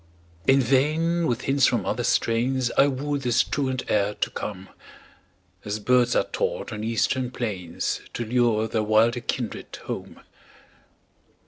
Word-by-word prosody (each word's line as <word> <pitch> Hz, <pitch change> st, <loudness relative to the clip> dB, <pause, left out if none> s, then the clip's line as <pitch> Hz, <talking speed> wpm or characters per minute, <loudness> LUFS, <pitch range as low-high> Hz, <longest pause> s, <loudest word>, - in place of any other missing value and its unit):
In 135 Hz, +1 st, +6 dB
vain 155 Hz, +7 st, +2 dB
with 120 Hz, -, -1 dB
hints 135 Hz, -1 st, +3 dB
from -, -, 0 dB
other -, -, -1 dB
strains 120 Hz, +2 st, +1 dB
I 140 Hz, -, +6 dB
wooed 145 Hz, +1 st, -2 dB
this 120 Hz, -2 st, +2 dB
truant 130 Hz, -2 st, -2 dB
air 105 Hz, 0 st, +1 dB
to -, -, -2 dB
come 95 Hz, -2 st, -6 dB, 0.9 s
As 105 Hz, +1 st, -3 dB
birds 120 Hz, +2 st, +2 dB
are -, -, +4 dB
taught -, -, -3 dB
on 105 Hz, 0 st, -5 dB
eastern 120 Hz, +3 st, 0 dB
plains 105 Hz, -9 st, -3 dB
To 120 Hz, -, -2 dB
lure 115 Hz, -2 st, +2 dB
their 110 Hz, 0 st, -1 dB
wilder 110 Hz, +3 st, +3 dB
kindred 120 Hz, -1 st, -4 dB
home. -, -, -6 dB
120 Hz, 140 wpm, -25 LUFS, 110-135 Hz, 0.9 s, In